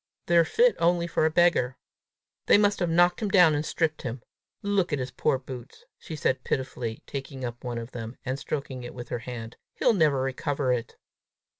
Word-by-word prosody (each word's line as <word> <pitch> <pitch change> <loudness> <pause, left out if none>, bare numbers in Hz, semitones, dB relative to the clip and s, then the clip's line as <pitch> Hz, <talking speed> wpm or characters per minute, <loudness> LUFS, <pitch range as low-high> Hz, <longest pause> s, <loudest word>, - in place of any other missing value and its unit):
They're 170 -1 +5
fit 480 - +3
only 170 0 +2
for 160 -1 +1
a - - +2
beggar! 160 -7 +3 0.7
They - - +7
must 205 0 +3
have 175 -2 0
knocked 175 +3 +3
him 210 - 0
down 180 -6 +6
and 145 0 0
stripped 160 -1 -1
him! 120 0 -5 0.4
Look 200 -3 +1
at 145 - +1
his 130 -1 -4
poor 125 - +1
boots!" 130 - -10
she 160 - -7
said 130 -3 0
pitifully, 125 -4 -3
taking 135 -1 -6
up 120 0 -7
one 120 -2 -3
of 115 +2 -6
them, 115 0 -7
and 130 +1 -2
stroking 135 -4 -4
it 120 - -8
with 120 -1 -8
her 120 - -2
hand. 115 -1 -7 0.2
"He'll 245 - +3
never 150 -8 +3
recover 135 0 -1
it!" 120 -2 -4
140 Hz, 195 wpm, -27 LUFS, 125-170 Hz, 0.7 s, They